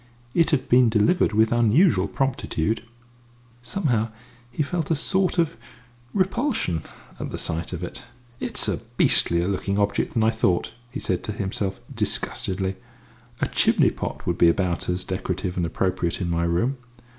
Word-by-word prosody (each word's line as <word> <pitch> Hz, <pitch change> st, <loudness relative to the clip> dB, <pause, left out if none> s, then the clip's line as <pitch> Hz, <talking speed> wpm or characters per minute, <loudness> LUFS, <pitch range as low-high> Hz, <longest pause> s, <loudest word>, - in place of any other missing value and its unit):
It 165 Hz, -1 st, +3 dB
had 145 Hz, -4 st, +1 dB
been 125 Hz, -1 st, +5 dB
delivered 110 Hz, -, +3 dB
with 110 Hz, +1 st, +3 dB
unusual 120 Hz, -, +4 dB
promptitude! 115 Hz, -6 st, -1 dB, 0.8 s
Somehow 125 Hz, -, 0 dB, 0.4 s
he 125 Hz, +5 st, -1 dB
felt 160 Hz, +1 st, -2 dB
a 165 Hz, -, +3 dB
sort 185 Hz, +5 st, +1 dB
of 165 Hz, -8 st, +1 dB, 0.5 s
repulsion 195 Hz, -, 0 dB, 0.4 s
at -, -, -4 dB
the -, -, -5 dB
sight 80 Hz, +1 st, -2 dB
of 90 Hz, -1 st, -5 dB
it. 90 Hz, -, -6 dB, 0.4 s
"It's -, -, 0 dB
a -, -, 0 dB, 0.2 s
beastlier 85 Hz, +1 st, +3 dB
looking 100 Hz, 0 st, -1 dB
object 100 Hz, 0 st, 0 dB
than 115 Hz, -, +3 dB
I 110 Hz, -, +4 dB
thought," 95 Hz, -6 st, +1 dB, 0.2 s
he 130 Hz, +4 st, -5 dB
said -, -, -1 dB
to -, -, -2 dB
himself 95 Hz, -1 st, -3 dB
disgustedly. 95 Hz, 0 st, -1 dB, 0.6 s
"A -, -, +2 dB
chimney -, -, +3 dB
pot -, -, -5 dB
would -, -, -1 dB
be 85 Hz, -, +7 dB
about 90 Hz, -1 st, 0 dB
as 90 Hz, +1 st, 0 dB
decorative 95 Hz, -1 st, -3 dB
and 85 Hz, -2 st, 0 dB
appropriate 90 Hz, 0 st, -1 dB
in 90 Hz, -3 st, -2 dB
my 85 Hz, 0 st, +1 dB
room. 115 Hz, +11 st, 0 dB
105 Hz, 155 wpm, -24 LUFS, 90-135 Hz, 0.8 s, be